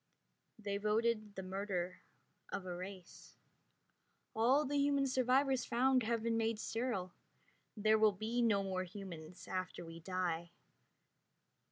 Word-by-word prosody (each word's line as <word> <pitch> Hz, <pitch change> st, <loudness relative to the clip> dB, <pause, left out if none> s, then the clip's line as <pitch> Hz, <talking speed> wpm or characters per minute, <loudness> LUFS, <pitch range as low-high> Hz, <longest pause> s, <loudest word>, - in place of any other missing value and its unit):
They 200 Hz, -2 st, -2 dB
voted 215 Hz, 0 st, +1 dB
the 190 Hz, -, -4 dB
murder 185 Hz, -1 st, -3 dB, 0.5 s
of 190 Hz, -, -3 dB
a 180 Hz, -1 st, -4 dB
race. 185 Hz, 0 st, -9 dB, 1.0 s
All 255 Hz, +7 st, +4 dB
the 285 Hz, +1 st, +1 dB
human 280 Hz, -1 st, +3 dB
survivors 260 Hz, 0 st, +3 dB
found 255 Hz, +2 st, +3 dB
have 230 Hz, 0 st, 0 dB
been 230 Hz, 0 st, +1 dB
made 225 Hz, 0 st, +1 dB
sterile. 225 Hz, -5 st, -2 dB, 0.6 s
There 215 Hz, +1 st, +4 dB
will 215 Hz, -1 st, +6 dB
be 220 Hz, +5 st, -1 dB
no 210 Hz, -4 st, +3 dB
more 185 Hz, -1 st, -1 dB
humans 175 Hz, -3 st, -9 dB
after 185 Hz, -2 st, -3 dB
we 165 Hz, 0 st, -9 dB
die. 170 Hz, -1 st, -2 dB
210 Hz, 130 wpm, -37 LUFS, 185-235 Hz, 1.0 s, will